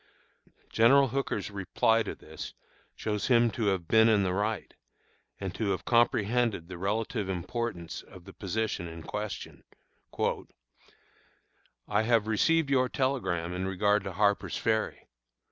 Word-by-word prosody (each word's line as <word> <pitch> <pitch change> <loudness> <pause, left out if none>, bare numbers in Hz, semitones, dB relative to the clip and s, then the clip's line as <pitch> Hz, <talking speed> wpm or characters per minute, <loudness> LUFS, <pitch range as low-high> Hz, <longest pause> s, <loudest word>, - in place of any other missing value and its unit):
General 135 +4 +5
Hooker's 120 -5 -2
reply 100 +3 +2
to - - -4
this 80 0 -9 0.4
shows 105 -2 -2
him 120 -2 +4
to 115 - -2
have 95 -4 0
been 110 +3 +5
in 105 -3 +4
the 90 -1 0
right, 105 +2 -2 0.7
and 95 -2 -4
to 105 +1 -2
have 95 - -2
comprehended 115 -4 +2
the 90 -2 -7
relative 105 +1 -1
importance 95 -1 -4
of 95 -2 -15
the - - -11
position 100 -2 -2
in 80 -1 -9
question: 105 +4 -6 2.2
"I 105 +1 +2
have 115 -1 +3
received 140 +7 +2
your 130 -2 +3
telegram 95 - -1
in 90 +1 -2
regard 100 +2 +2
to 95 - -4
Harper's 100 +2 +1
Ferry. 110 -1 -1
105 Hz, 135 wpm, -29 LUFS, 95-115 Hz, 2.2 s, General